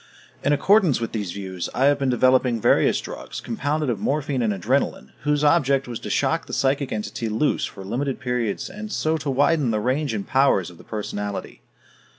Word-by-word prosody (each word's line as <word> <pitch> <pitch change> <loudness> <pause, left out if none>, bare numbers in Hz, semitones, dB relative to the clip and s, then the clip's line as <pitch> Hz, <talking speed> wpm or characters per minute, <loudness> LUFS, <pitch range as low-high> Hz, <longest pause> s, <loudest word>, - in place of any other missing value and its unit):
In 145 - +2
accordance 175 - +4
with 115 - -3
these 105 -5 -3
views, 95 -2 -5
I 130 - +3
had 145 0 +4
been 135 -1 +1
developing 125 -1 +3
various - - +3
drugs, - - -7
compounded 145 +6 -2
of 120 -5 -1
morphine 140 +1 -1
and 110 -2 +1
adrenalin, 90 -8 -1
whose 150 0 +2
object 140 -4 +3
was 120 -2 -5
to - - -7
shock - - 0
the - - -8
psychic 135 0 +1
entity 110 +1 -3
loose 115 +8 +1
for 95 -2 -9
limited 130 +6 -2
periods 125 -4 -2
and 215 +1 -8
so 160 -4 0
to 150 -2 -4
widen 140 0 +2
the 110 -1 +1
range 130 +3 0
and 100 - -3
powers 130 -10 +2
of 85 - -17
the - - -13
personality. 105 -1 -5
130 Hz, 190 wpm, -23 LUFS, 110-145 Hz, -, accordance